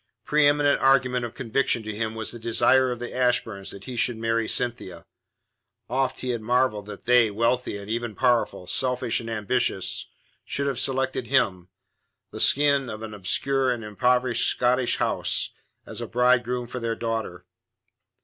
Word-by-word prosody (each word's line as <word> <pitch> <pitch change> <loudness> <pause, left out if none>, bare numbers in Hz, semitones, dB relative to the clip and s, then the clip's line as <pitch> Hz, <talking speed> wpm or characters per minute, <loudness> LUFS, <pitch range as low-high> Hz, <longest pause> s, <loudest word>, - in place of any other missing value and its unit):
Pre 150 -1 +4
eminent 145 0 +3
argument 125 -2 +3
of 120 - -8
conviction 125 -1 0
to 110 0 -5
him 110 +1 -3
was 110 -1 -4
the 120 - -9
desire 130 +3 +3
of 125 - -3
the 120 +1 -6
Ashburns 120 -6 0
that 100 - -10
he 125 - -7
should 120 0 0
marry 115 0 -1
Cynthia. 95 -8 -3 0.9
Oft 130 0 -1
he 130 - -4
had 120 -2 -2
marvelled 110 -3 0
that 105 - -10
they, 125 -2 +5
wealthy, 115 +2 0
and 100 0 -9
even 115 0 -3
powerful, 120 -7 +1
selfish 125 +2 0
and 115 - -7
ambitious, 110 -2 +1 0.4
should 140 - -2
have 135 -3 -1
selected 130 -2 -1
him, 90 -4 +1 0.6
the - - -8
scion 140 -2 +3
of 110 0 -7
an 110 -1 -7
obscure 130 +7 0
and 120 -2 -2
impoverished 125 +3 +1
Scottish 125 0 +1
house, - - 0 0.3
as - - -8
a - - -4
bridegroom 125 0 +1
for 125 +1 -6
their 115 -1 -2
daughter. 115 -1 -4
120 Hz, 165 wpm, -25 LUFS, 110-130 Hz, 0.9 s, they